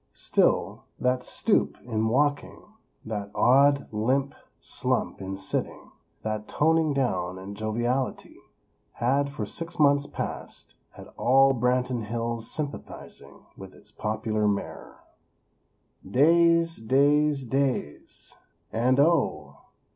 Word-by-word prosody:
Still, -, -, 0 dB
that 125 Hz, 0 st, 0 dB
stoop -, -, 0 dB
in 110 Hz, -2 st, -1 dB
walking; 145 Hz, +5 st, 0 dB, 0.5 s
that 105 Hz, -2 st, -4 dB
odd, 140 Hz, +3 st, +4 dB
limp 130 Hz, +6 st, 0 dB, 0.3 s
slump -, -, -2 dB
in 95 Hz, 0 st, -5 dB
sitting; 95 Hz, 0 st, -4 dB, 0.3 s
that 110 Hz, -1 st, -3 dB
toning 160 Hz, 0 st, +2 dB
down 95 Hz, -10 st, -1 dB
in 95 Hz, +2 st, -8 dB
joviality, 120 Hz, +5 st, -2 dB, 0.6 s
had, 140 Hz, +4 st, +1 dB
for 145 Hz, -, -5 dB
six 170 Hz, 0 st, -6 dB
months 145 Hz, -2 st, +3 dB
past, -, -, -6 dB, 0.2 s
had -, -, -12 dB
all 135 Hz, +2 st, +4 dB
Branton 125 Hz, -1 st, 0 dB
Hills 115 Hz, +1 st, -4 dB
sympathizing 145 Hz, -2 st, -8 dB
with -, -, -11 dB
its -, -, -16 dB
popular 110 Hz, 0 st, -1 dB
Mayor. 100 Hz, -1 st, -4 dB, 1.1 s
Days; 165 Hz, -, +4 dB
days; 140 Hz, +4 st, +2 dB
days! 130 Hz, -, -3 dB, 0.4 s
And, 125 Hz, +4 st, +2 dB
oh! 140 Hz, -, +1 dB
125 Hz, 105 wpm, -26 LUFS, 110-140 Hz, 1.1 s, odd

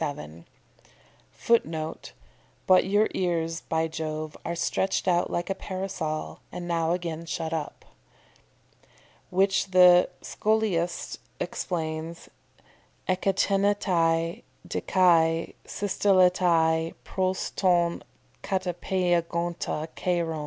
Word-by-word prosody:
[Footnote: 160 Hz, -9 st, -1 dB, 0.5 s
"But 185 Hz, -1 st, +5 dB
your 205 Hz, +3 st, +3 dB
ears, 165 Hz, -2 st, -1 dB
by 160 Hz, 0 st, +1 dB
Jove, 155 Hz, -1 st, -4 dB
are 170 Hz, -, -3 dB
stretched 190 Hz, +3 st, 0 dB
out 175 Hz, -1 st, +2 dB
like 175 Hz, +2 st, -2 dB
a -, -, +2 dB
parasol, 185 Hz, -5 st, -4 dB
and 175 Hz, -1 st, -6 dB
now 165 Hz, -1 st, 0 dB
again 170 Hz, -2 st, -4 dB
shut 160 Hz, 0 st, -3 dB
up."] 155 Hz, -2 st, -5 dB, 1.4 s
Which 195 Hz, +1 st, +2 dB
the 180 Hz, -1 st, +6 dB
Scholiast 205 Hz, -6 st, -1 dB, 0.2 s
explains, 160 Hz, -1 st, -4 dB, 0.8 s
_ekteinetai 185 Hz, -3 st, +1 dB, 0.3 s
de -, -, -3 dB
kai 165 Hz, -3 st, +3 dB
systelletai 180 Hz, -5 st, +2 dB
pros 185 Hz, 0 st, -2 dB
ton 175 Hz, -3 st, +2 dB, 0.4 s
katepeigonta 175 Hz, -3 st, -1 dB
kairon. 170 Hz, -3 st, -1 dB
175 Hz, 85 wpm, -27 LUFS, 165-185 Hz, 1.4 s, the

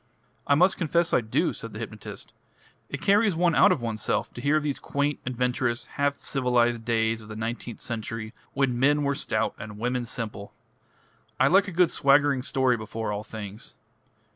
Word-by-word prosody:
"I 140 Hz, -, +5 dB
must 180 Hz, +5 st, +3 dB
confess 170 Hz, +1 st, +1 dB
I -, -, +4 dB
do," 110 Hz, -1 st, 0 dB
said -, -, -8 dB
the -, -, -7 dB
hypnotist. -, -, -8 dB, 0.6 s
"It -, -, -6 dB
carries 205 Hz, -1 st, +4 dB
one 170 Hz, 0 st, +2 dB
out -, -, +6 dB
of 155 Hz, -10 st, 0 dB
oneself 110 Hz, -2 st, -1 dB
to 120 Hz, -, -7 dB
hear 145 Hz, +3 st, +3 dB
of 155 Hz, -, -1 dB
those 145 Hz, -2 st, -2 dB
quaint, 145 Hz, +1 st, -1 dB
adventurous, 125 Hz, 0 st, -1 dB
half 145 Hz, 0 st, -1 dB
civilised 120 Hz, -4 st, +1 dB
days 115 Hz, -1 st, 0 dB
of 105 Hz, -, -13 dB
the 110 Hz, -, -7 dB
nineteenth 115 Hz, +1 st, -5 dB
century, 115 Hz, -1 st, -5 dB, 0.2 s
when 130 Hz, -3 st, +1 dB
men 145 Hz, +3 st, +3 dB
were 140 Hz, 0 st, +1 dB
stout 110 Hz, -6 st, -1 dB
and 105 Hz, -1 st, -8 dB
women 125 Hz, +2 st, -1 dB
simple. 110 Hz, -3 st, -5 dB, 0.8 s
I 130 Hz, -, +5 dB
like 195 Hz, +3 st, +5 dB
a -, -, -4 dB
good 175 Hz, -1 st, +3 dB
swaggering 140 Hz, -1 st, +4 dB
story 130 Hz, -1 st, +1 dB
before 110 Hz, 0 st, -4 dB
all 105 Hz, 0 st, -3 dB
things. 105 Hz, 0 st, -8 dB
125 Hz, 180 wpm, -26 LUFS, 115-145 Hz, 0.8 s, out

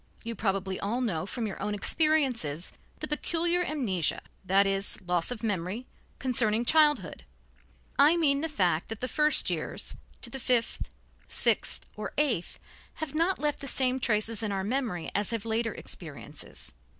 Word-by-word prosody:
You 230 Hz, -, -3 dB
probably 195 Hz, -3 st, -1 dB
all 220 Hz, +5 st, -1 dB
know 190 Hz, -8 st, -1 dB
from 235 Hz, +2 st, -3 dB
your 205 Hz, -, -5 dB
own 205 Hz, +1 st, -1 dB
experiences 250 Hz, -, +1 dB, 0.3 s
the 305 Hz, -, -2 dB
peculiar 340 Hz, +3 st, 0 dB
amnesia, 230 Hz, -, 0 dB, 0.2 s
that 195 Hz, +2 st, +4 dB
is, 195 Hz, 0 st, +1 dB
loss 175 Hz, -1 st, +1 dB
of 245 Hz, -2 st, -4 dB
memory, 205 Hz, +3 st, -2 dB, 0.3 s
concerning 235 Hz, -3 st, +1 dB
childhood. 305 Hz, +1 st, +3 dB, 0.8 s
I 300 Hz, +5 st, +7 dB
mean 285 Hz, -4 st, +3 dB
the 325 Hz, -, -1 dB
fact 180 Hz, -, +1 dB
that 225 Hz, -1 st, -5 dB
the 255 Hz, -, -2 dB
first 300 Hz, +4 st, +3 dB
years, -, -, -3 dB, 0.3 s
to -, -, -4 dB
the 270 Hz, -, -5 dB
fifth, 240 Hz, -2 st, +1 dB, 0.4 s
sixth -, -, +2 dB
or -, -, -5 dB
eighth, 250 Hz, -, +1 dB, 0.4 s
have 315 Hz, -3 st, -5 dB
not 335 Hz, +5 st, +2 dB
left 295 Hz, -1 st, -1 dB
the 275 Hz, -, -6 dB
same 260 Hz, 0 st, +2 dB
traces 220 Hz, -2 st, +1 dB
in 215 Hz, -2 st, -1 dB
our 195 Hz, -1 st, -1 dB
memory 220 Hz, -6 st, -2 dB
as 205 Hz, 0 st, +1 dB
have 230 Hz, -2 st, -2 dB
later 225 Hz, 0 st, 0 dB
experiences. 150 Hz, -3 st, -7 dB
230 Hz, 160 wpm, -29 LUFS, 195-280 Hz, 0.8 s, I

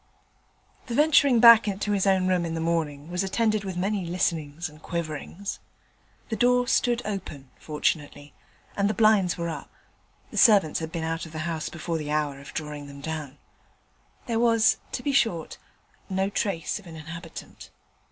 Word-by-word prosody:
The 235 Hz, -, -3 dB
venturing 285 Hz, -4 st, +5 dB
back 230 Hz, -2 st, +9 dB
to 205 Hz, -, -1 dB
his 200 Hz, -1 st, +1 dB
own 190 Hz, -1 st, +3 dB
room 180 Hz, -2 st, +2 dB
in 165 Hz, -1 st, -3 dB
the -, -, -2 dB
morning 160 Hz, -2 st, -2 dB
was 180 Hz, +2 st, 0 dB
attended 215 Hz, +2 st, +1 dB
with 190 Hz, -2 st, -5 dB
many 195 Hz, +2 st, -1 dB
listenings 170 Hz, -2 st, -2 dB
and 155 Hz, 0 st, -15 dB
quiverings. 170 Hz, +4 st, -5 dB, 0.7 s
The 225 Hz, -, -1 dB
door 245 Hz, +2 st, +3 dB
stood 245 Hz, -1 st, +1 dB
open, 155 Hz, -10 st, -6 dB
fortunately, 150 Hz, -1 st, -2 dB, 0.4 s
and 200 Hz, 0 st, +1 dB
the 215 Hz, -, -1 dB
blinds 215 Hz, -5 st, +4 dB
were 170 Hz, -1 st, -2 dB
up 160 Hz, -, -7 dB, 0.6 s
(the -, -, -7 dB
servants 200 Hz, -9 st, +5 dB
had 160 Hz, -1 st, -5 dB
been 165 Hz, -1 st, -3 dB
out 165 Hz, +1 st, -3 dB
of 160 Hz, -, -14 dB
the 155 Hz, 0 st, -4 dB
house 165 Hz, -2 st, -3 dB
before 170 Hz, -1 st, -4 dB
the 150 Hz, -1 st, -5 dB
hour 150 Hz, -2 st, -1 dB
of 140 Hz, -, -11 dB
drawing 150 Hz, -2 st, -5 dB
them 140 Hz, 0 st, -11 dB
down); 150 Hz, -2 st, -5 dB, 0.9 s
there 230 Hz, -3 st, -1 dB
was, 230 Hz, -2 st, +4 dB, 0.2 s
to 250 Hz, -, -3 dB
be 285 Hz, -, 0 dB
short, 225 Hz, -, 0 dB, 0.5 s
no 190 Hz, +1 st, 0 dB
trace 195 Hz, -4 st, -2 dB
of 200 Hz, -, -15 dB
an 165 Hz, -, -10 dB
inhabitant. 165 Hz, +2 st, -9 dB
175 Hz, 170 wpm, -26 LUFS, 155-210 Hz, 0.9 s, back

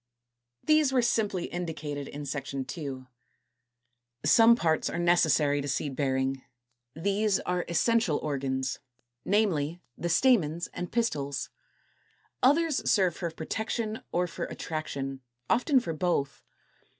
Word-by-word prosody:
228. 310 Hz, 0 st, +5 dB
These 295 Hz, -4 st, +2 dB
were 255 Hz, -, +4 dB
simply 210 Hz, -6 st, 0 dB
indicated 155 Hz, -5 st, -5 dB
in 145 Hz, 0 st, -7 dB
Section 140 Hz, -1 st, -4 dB
II. -, -, -5 dB, 0.4 s
16. -, -, -32 dB, 1.2 s
Some 225 Hz, +9 st, +7 dB
parts 160 Hz, -7 st, +1 dB
are -, -, -4 dB
necessary 165 Hz, -4 st, +3 dB
to 140 Hz, -, -5 dB
seed 140 Hz, 0 st, -2 dB
bearing; 135 Hz, -1 st, 0 dB, 0.5 s
these 200 Hz, +4 st, +1 dB
are 180 Hz, -1 st, -1 dB
Essential 195 Hz, -2 st, +2 dB
Organs, 135 Hz, -2 st, -2 dB, 0.5 s
namely, 180 Hz, -6 st, +1 dB, 0.2 s
the 175 Hz, -, -3 dB
Stamens 170 Hz, -, +3 dB
and 180 Hz, -, -5 dB
Pistils. 145 Hz, -, -1 dB, 0.9 s
Others 305 Hz, +3 st, +3 dB
serve 185 Hz, -5 st, +3 dB
for 170 Hz, -, -3 dB
protection 215 Hz, +7 st, -3 dB
or 180 Hz, +1 st, +1 dB
for 175 Hz, -, -5 dB
attraction, 135 Hz, -4 st, -5 dB, 0.3 s
often 265 Hz, +3 st, +4 dB
for 200 Hz, -10 st, -4 dB
both. 150 Hz, -5 st, -1 dB
170 Hz, 125 wpm, -28 LUFS, 145-215 Hz, 1.2 s, Some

